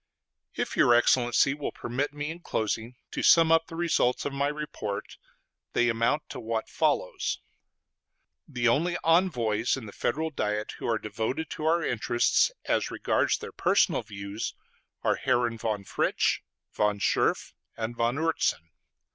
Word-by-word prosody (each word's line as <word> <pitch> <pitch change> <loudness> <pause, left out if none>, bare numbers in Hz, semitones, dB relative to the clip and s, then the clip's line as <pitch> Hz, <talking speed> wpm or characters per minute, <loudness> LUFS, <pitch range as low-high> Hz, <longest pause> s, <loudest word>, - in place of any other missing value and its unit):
If - - -2
your 120 - +5
Excellency 120 +2 +4
will 145 0 -4
permit 130 +5 -3
me, 145 +1 -4
in 165 - -8
closing, 115 -5 -2 0.2
to - - -3
sum 165 -2 +6
up 165 0 +4
the 165 - -9
results 165 -7 +1
of 145 - -2
my 140 +1 +1
report, 145 -9 -5 0.6
they 120 0 +3
amount 115 +6 +1
to - - -6
what 115 -1 -3
follows: - - 0 1.1
The 120 0 0
only 170 +9 +2
envoys 125 - +2
in 125 - -7
the 105 - -8
Federal 155 +10 -2
Diet 105 -5 -2
who - - -4
are 115 -1 +2
devoted 115 +9 -3
to 155 - -4
our 170 +1 +3
interests 120 -1 +2 0.2
as - - +1
regards - - +1
their - - -8
personal - - +2
views 100 -1 -6 0.5
are - - +2
Herren 120 -2 0
von 105 -3 -2
Fritsch, - - 0 0.3
von 105 -1 +1
Scherff, 100 - +1 0.2
and 115 +1 -3
von 115 +1 +1
Oertzen. 155 - 0
120 Hz, 150 wpm, -28 LUFS, 110-150 Hz, 1.1 s, sum